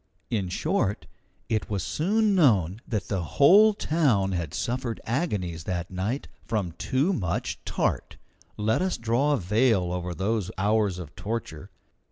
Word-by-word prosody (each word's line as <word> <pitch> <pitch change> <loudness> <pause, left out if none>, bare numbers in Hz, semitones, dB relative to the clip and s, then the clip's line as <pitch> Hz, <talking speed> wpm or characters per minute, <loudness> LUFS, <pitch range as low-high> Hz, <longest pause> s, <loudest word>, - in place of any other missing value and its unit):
In 100 -5 -1
short, 110 - -1 0.4
it 110 -1 -1
was 100 -4 -2
soon 210 - +1
known 110 - +3
that 105 -7 -2
the 95 -3 -1
whole 180 - +6
town 130 - +1
had 85 -5 -2
suffered 120 +4 -3
agonies 100 - -2
that 90 -1 -3
night 100 +9 -2 0.2
from 105 -6 -2
too 145 +9 +1
much 90 - -2
tart. - - -1 0.4
Let 110 +7 +1
us 185 0 0
draw 120 +6 +1
a - - +2
veil 100 -2 +2
over 90 -1 -3
those 100 0 -1
hours 105 -1 +1
of 85 -5 -9
torture. 100 -6 -5
105 Hz, 145 wpm, -26 LUFS, 90-130 Hz, 0.4 s, whole